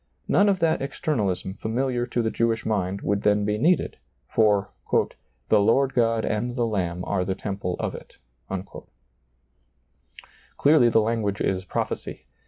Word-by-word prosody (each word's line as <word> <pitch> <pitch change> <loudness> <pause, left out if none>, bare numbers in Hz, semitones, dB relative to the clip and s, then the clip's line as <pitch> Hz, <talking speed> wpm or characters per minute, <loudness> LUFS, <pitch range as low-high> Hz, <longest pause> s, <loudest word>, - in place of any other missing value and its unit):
None 205 +1 +4
of 195 -2 +1
that 160 -3 +2
externalism 105 - -2
liamiliar 120 +3 -2
to 120 0 0
the 110 - 0
Jewish 115 -1 0
mind 100 -3 -1
would 100 +1 0
then 105 0 +2
be 105 0 0
needed, 175 +8 +2 0.3
for 105 -2 +2 0.4
" - - -29
the 110 - +5
Lord 130 +6 +3
God 115 -2 +2
and 120 +3 -2
the 120 -2 +1
Lamb 90 -5 -2
are 95 -3 0
the 95 +1 -2
temple 95 -3 -3
of - - -3
it" - - -11 2.4
Clearly 140 -5 +5
the 110 - +4
language 105 -2 -1
is 95 -1 -1
prophecy. - - -4
110 Hz, 150 wpm, -25 LUFS, 100-120 Hz, 2.4 s, the